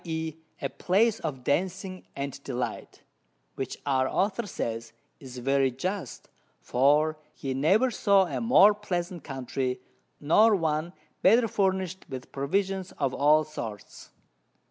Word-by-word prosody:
e._ 160 -2 -3 0.3
a - - +2
Place 215 +5 +1
of 135 -6 -5
Dancing 185 +5 -2
and 140 0 -5
Delight, 125 -2 -5 0.5
which 135 - -5
our 130 -2 +1
Author 205 +3 0
says 115 - -4 0.3
is 130 -2 -10
very 135 +2 +2
just, 180 +10 -5 0.3
for 150 +4 +2 0.2
he 135 -1 -4
never 190 - +3
saw 200 -3 +4
a - - -4
more 220 -3 +6
pleasant 180 -5 -4
Country, 130 -1 -3 0.4
nor 210 +9 +5
one 160 -1 -1 0.3
better 230 +5 +5
furnish'd 190 -3 -1
with 130 -1 -7
Provisions 190 +7 -1
of 135 -3 -1
all 150 +3 +4
sorts. 115 -9 -8
155 Hz, 125 wpm, -27 LUFS, 135-190 Hz, 0.5 s, more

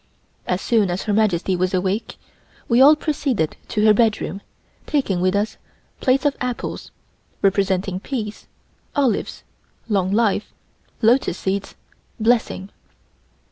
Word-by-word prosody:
As 180 +1 -1
soon 220 -5 +2
as 175 +2 -2
Her 210 - -1
Majesty 195 -3 +2
was 185 +1 0
awake, 190 +4 -2 0.5
we 240 +2 +4
all 290 +3 +8
proceeded 275 - -1
to 210 0 0
her 215 - +7
bedroom, 215 -3 +1 0.5
taking 205 -12 0
with 185 +1 +2
us 205 +2 -1 0.4
plates 265 +2 +2
of 285 -1 +2
apples 250 -1 -4 0.5
(representing 195 -1 +1
"Peace"), 215 -2 -5 0.5
olives 270 -5 0 0.4
("Long 195 -4 +1
Life"), 210 -1 +1 0.5
lotus 230 -5 +3
seeds 195 +1 -3 0.4
(Blessing). 220 -4 +1
210 Hz, 120 wpm, -21 LUFS, 190-240 Hz, 0.5 s, all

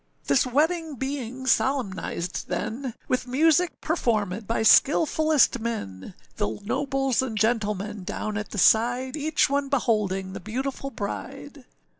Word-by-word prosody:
This 140 - +3
wedding 315 +4 0
being 260 -1 -4
solemnized 205 -10 -1
then, 230 +8 -4
With 255 0 -1
music 320 +6 +2
performèd 215 - -1
by 230 -1 0
skilfullest 305 +1 +4
men, 100 - -5 0.2
The 105 +1 -2
nobles 270 +3 0
and 240 -5 -4
gentlemen 210 -2 -1
down 215 +3 -4
at 210 +1 -4
the - - -7
side, 245 - +3
Each 310 +1 +1
one 280 0 -1
beholding 205 -8 0
the 195 - -6
beautiful 265 +7 -4
bride. 200 - -7
240 Hz, 125 wpm, -25 LUFS, 210-275 Hz, 0.2 s, skilfullest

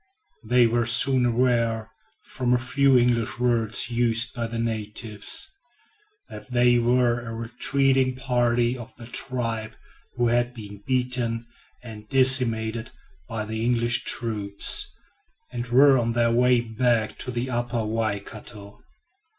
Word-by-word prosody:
They 120 +2 +3
were 115 0 0
soon 125 +2 +3
aware, 115 -2 0 0.3
from 125 -1 -1
a - - +2
few 135 +1 +2
English 120 -2 +1
words 120 -1 0
used 120 0 +1
by 120 -1 -3
the 115 +1 -6
natives, 110 - -2 0.7
that - - -11
they 120 -1 +3
were 120 0 +1
a 115 -1 -7
retreating 130 +3 0
party 120 -2 0
of 120 -1 -11
the 120 - -12
tribe 115 -3 -1 0.4
who 120 -1 +1
had 120 +1 0
been 105 -3 -10
beaten 125 -3 -1 0.4
and 110 -3 -11
decimated 120 -3 +2 0.4
by 110 -1 -4
the 110 +1 -4
English 120 0 +1
troops, 105 -4 0 0.6
and 120 0 -5
were 135 +2 +5
on 115 0 -1
their 115 0 +1
way 125 +1 +3
back 115 -1 -1
to - - -6
the 125 +1 -3
Upper 120 -1 -2
Waikato. 105 -1 -5
120 Hz, 130 wpm, -24 LUFS, 115-125 Hz, 0.7 s, were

